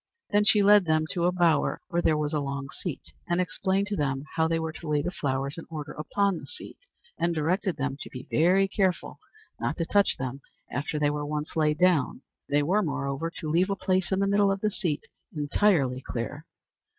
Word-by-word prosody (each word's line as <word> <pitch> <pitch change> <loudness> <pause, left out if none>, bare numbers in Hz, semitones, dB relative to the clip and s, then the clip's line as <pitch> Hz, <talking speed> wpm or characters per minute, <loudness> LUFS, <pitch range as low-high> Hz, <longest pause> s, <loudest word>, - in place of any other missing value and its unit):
Then 205 0 +4
she 210 -1 +5
led 205 -1 +6
them 155 -1 +2
to 175 -2 0
a 180 - +4
bower 175 -3 +2
where 175 - +1
there 155 - +3
was 150 0 -1
a 150 - +1
long 140 -1 -4
seat, 175 -7 -6 0.2
and 175 +1 +2
explained 190 +3 0
to 205 - -1
them 135 -3 -1
how 160 0 +3
they 165 0 +1
were 160 -1 -2
to 160 +1 -10
lay 150 -1 +1
the 180 - -2
flowers 140 -3 -2
in - - -10
order 155 -2 -6
upon 195 +3 0
the - - -11
seat, - - -10 0.4
and 170 0 +1
directed 180 +5 0
them 140 0 -2
to - - -7
be 125 -1 -8
very 185 +5 +4
careful 190 -3 -1 0.4
not - - -2
to 165 - -1
touch 200 +3 +3
them 130 +1 -4 0.3
after 145 +1 -2
they 145 -1 +2
were 150 0 -3
once 150 +1 -4
laid 150 -1 +2
down. 175 -7 +2 0.3
They 145 +1 +3
were, 190 +8 +2
moreover, 140 -2 -2
to 155 -2 -5
leave 180 +4 +3
a 200 - +1
place 185 -1 0
in 190 - +2
the 200 - +2
middle 200 0 +3
of 195 0 -2
the 215 - +1
seat 170 -7 -2 0.3
entirely 145 -4 +2
clear. 130 +6 -5
160 Hz, 215 wpm, -27 LUFS, 145-190 Hz, 0.4 s, led